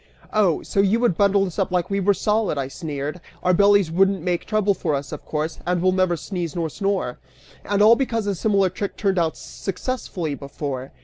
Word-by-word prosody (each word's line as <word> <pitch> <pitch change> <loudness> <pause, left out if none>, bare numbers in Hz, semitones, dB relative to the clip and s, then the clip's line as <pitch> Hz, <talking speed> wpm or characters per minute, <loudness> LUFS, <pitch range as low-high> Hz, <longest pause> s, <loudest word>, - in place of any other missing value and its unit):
"Oh! 200 -7 +2
So - - -2
you 200 +3 +3
would 235 -8 +2
bundle 200 0 +3
us 180 +1 -6
up 195 - +1
like 180 0 -1
we 200 - +1
were 200 +1 +3
solid," 210 -3 0
I 135 -1 -2
sneered; 150 +1 -5 0.2
"our 180 - +3
bellies 200 -2 +4
wouldn't 190 0 +2
make 175 -1 -1
trouble 215 -2 +2
for 160 -6 -1
us, 140 0 -5
of - - -7
course, 155 +1 -3
and 180 0 0
we'll 185 +2 +3
never 185 -2 +1
sneeze 170 -1 -4
nor 165 -2 -1
snore! 195 -11 -2 0.4
And 205 0 +2
all 225 +2 +8
because 230 -4 -1
a 200 - 0
similar 195 0 +2
trick 200 +2 -4
turned 195 -3 +1
out 165 -2 0
successfully 190 - -4
before! 140 -1 -5
185 Hz, 205 wpm, -22 LUFS, 165-200 Hz, 0.4 s, all